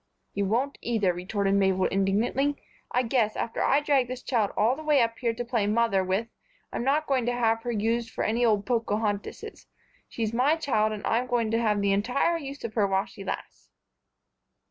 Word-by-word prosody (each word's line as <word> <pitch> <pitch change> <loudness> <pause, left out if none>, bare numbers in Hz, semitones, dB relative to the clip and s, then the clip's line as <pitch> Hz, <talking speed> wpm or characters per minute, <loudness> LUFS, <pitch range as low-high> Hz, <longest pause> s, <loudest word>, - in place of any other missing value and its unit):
"You 200 0 -1
won't 250 +8 -1
either," 210 -6 +1
retorted 195 +3 -1
Mabel, 190 -1 +2
indignantly. 215 +9 +1 0.3
"I 250 - +1
guess, 225 -3 +1
after 230 - -3
I 280 +2 +3
dragged 275 -4 +2
this 255 0 -6
child 225 -6 +1
all 230 +5 +3
the 310 - -9
way 300 -2 +3
up 230 -1 0
here 235 -2 +1
to 240 +1 -5
play 230 -4 0
'Mother' 215 -3 +2
with, 190 +5 -1 0.5
I'm - - -2
not 290 +4 +1
going 260 -4 0
to 245 - +1
have 225 -2 +1
her 240 - -3
used 230 +1 0
for - - -3
any 230 +3 +1
old 210 -3 +2
Pocohontises. 215 -4 -2 0.4
She's 225 -1 -3
my 265 +6 +3
child, 240 -9 +1
and 210 -1 -5
I'm 240 +3 +1
going 235 -3 0
to 230 +1 +1
have 210 -3 +1
the 200 -1 +2
entire 250 +11 +1
use 280 -1 -8
of 230 -2 -5
her 210 -3 +2
while 195 0 +1
she 200 - -11
lasts." - - -7
230 Hz, 200 wpm, -27 LUFS, 205-250 Hz, 0.5 s, I